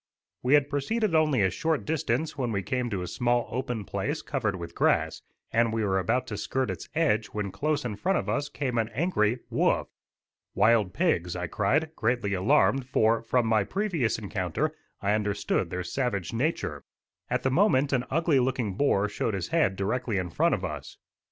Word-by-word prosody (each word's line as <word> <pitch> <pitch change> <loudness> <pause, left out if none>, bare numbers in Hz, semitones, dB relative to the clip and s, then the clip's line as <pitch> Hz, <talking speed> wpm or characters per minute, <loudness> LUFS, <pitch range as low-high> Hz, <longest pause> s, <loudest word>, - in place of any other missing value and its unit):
We 130 +4 +4
had 145 -1 +3
proceeded 180 +9 -1
only 150 -8 +3
a 95 - +2
short 160 -2 -1
distance 160 0 -1
when 125 -4 -2
we 100 -2 -1
came 125 +5 -1
to 95 -5 -2
a - - -5
small 120 +2 0
open 125 -4 -3
place 145 +11 -3
covered 110 -8 -1
with 85 -2 -7
grass, - - +1 0.3
and 115 0 +3
we 110 0 -1
were 95 -1 +1
about 120 +6 0
to 105 -4 -5
skirt 130 +2 -1
its 90 - -7
edge 120 -10 +2
when 105 -1 -4
close 150 +2 -1
in 110 -4 -3
front 190 - +1
of - - -3
us 145 - -1
came 125 -5 -2
an 110 0 0
angry 125 - +1
"woof." - - +1 0.7
"Wild 110 -4 +4
pigs," 90 - +1
I 90 0 -2
cried, 155 - 0
greatly 115 -3 0
alarmed, 130 +6 +3
for, 115 -3 +2
from 120 +1 +1
my 110 -2 +3
previous 175 - -1
encounter, 105 - -2 0.3
I 100 +1 +2
understood 105 -4 0
their 90 +1 -3
savage 100 -2 -2
nature. 145 +9 -1 0.5
At 125 +1 0
the 130 - +1
moment 145 -4 +3
an 125 -1 +1
ugly 160 -1 +2
looking 125 -5 0
boar 105 -3 +2
showed 105 +1 -2
his 95 - -4
head 160 - +2
directly 110 +3 -1
in 90 -2 -2
front - - +2
of - - -4
us. - - -7
120 Hz, 190 wpm, -27 LUFS, 105-145 Hz, 0.7 s, We